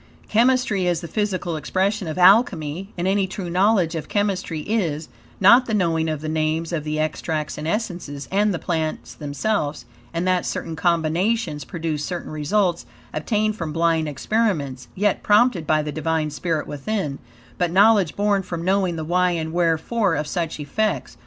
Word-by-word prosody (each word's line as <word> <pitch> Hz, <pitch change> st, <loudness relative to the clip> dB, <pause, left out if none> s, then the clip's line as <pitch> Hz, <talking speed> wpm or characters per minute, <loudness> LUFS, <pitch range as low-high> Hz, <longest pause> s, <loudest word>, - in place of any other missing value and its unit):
Chemistry 230 Hz, -5 st, +2 dB
is 175 Hz, -1 st, 0 dB
the 170 Hz, -, -6 dB
physical 190 Hz, -4 st, -2 dB
expression 190 Hz, +5 st, -1 dB
of 155 Hz, -, -4 dB
Alchemy, 185 Hz, -2 st, +3 dB
and 175 Hz, +1 st, -1 dB
any 195 Hz, 0 st, +2 dB
true 185 Hz, -2 st, -5 dB
knowledge 185 Hz, -2 st, +3 dB
of 160 Hz, -2 st, -5 dB
chemistry 190 Hz, -6 st, -1 dB
is: 165 Hz, -6 st, -1 dB, 0.3 s
not 235 Hz, +6 st, +6 dB
the 220 Hz, -, 0 dB
knowing 165 Hz, -4 st, +1 dB
of 155 Hz, -2 st, -3 dB
the 155 Hz, -, -4 dB
names 155 Hz, +2 st, -1 dB
of 155 Hz, -3 st, -1 dB
the 155 Hz, 0 st, -2 dB
extracts 155 Hz, 0 st, -2 dB
and 150 Hz, +1 st, -5 dB
essences, 170 Hz, -8 st, -3 dB
and 205 Hz, +2 st, +2 dB
the 180 Hz, -, -1 dB
plants 155 Hz, -9 st, -3 dB
themselves, 145 Hz, -, -2 dB, 0.3 s
and 170 Hz, +2 st, -2 dB
that 185 Hz, -1 st, +2 dB
certain 165 Hz, -1 st, -4 dB
combinations 170 Hz, +1 st, 0 dB
produce 160 Hz, -4 st, -3 dB
certain 175 Hz, 0 st, -5 dB
results, 170 Hz, +4 st, 0 dB, 0.3 s
obtained 210 Hz, +7 st, 0 dB
from 165 Hz, -7 st, -4 dB
blind 165 Hz, -1 st, +1 dB
experiments, 145 Hz, -, -1 dB
yet, 205 Hz, 0 st, +1 dB
prompted 205 Hz, -6 st, +3 dB
by 155 Hz, -1 st, +2 dB
the 150 Hz, -, -4 dB
Divine 160 Hz, 0 st, -1 dB
spirit 160 Hz, +1 st, -2 dB
within; 150 Hz, 0 st, -3 dB, 0.4 s
but, 175 Hz, -, +2 dB
knowledge 195 Hz, -2 st, +4 dB
born 205 Hz, -1 st, +2 dB
from 170 Hz, -3 st, -5 dB
knowing 190 Hz, -2 st, +1 dB
the 160 Hz, -1 st, -4 dB
why 180 Hz, +2 st, +2 dB
and 160 Hz, -1 st, -3 dB
wherefore 175 Hz, +4 st, +1 dB
of 150 Hz, +1 st, -1 dB
such 165 Hz, 0 st, -3 dB
effects. 215 Hz, +9 st, -2 dB
170 Hz, 165 wpm, -22 LUFS, 155-200 Hz, 0.4 s, not